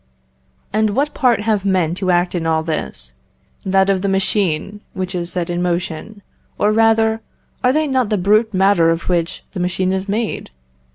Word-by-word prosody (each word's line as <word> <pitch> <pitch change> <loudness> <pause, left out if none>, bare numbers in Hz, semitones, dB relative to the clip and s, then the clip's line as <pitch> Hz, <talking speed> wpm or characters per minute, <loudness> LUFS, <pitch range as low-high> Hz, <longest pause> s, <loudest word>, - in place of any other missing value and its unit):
And 215 -1 +1
what 290 +2 0
part 240 -5 +2
have 210 -2 0
men 185 -5 +1
to 185 +1 -2
act 175 0 +2
in 170 -2 -2
all 160 -1 +1
this? 65 - -4 0.5
That 190 0 +2
of 195 -2 +1
the 200 - 0
machine, 195 0 0
which 185 0 -4
is 175 -1 -3
set 175 -2 -2
in 175 0 -2
motion; 180 +3 -3 0.3
or 210 - +2
rather, 225 0 +3 0.4
are 250 - +4
they 310 +3 +1
not 260 -6 0
the 210 - +1
brute 215 +4 +3
matter 190 -3 +3
of 165 +2 -1
which 170 -2 -1
the 190 - -6
machine 185 +1 0
is 190 +1 -3
made? 220 +2 -2
190 Hz, 180 wpm, -18 LUFS, 175-215 Hz, 0.5 s, are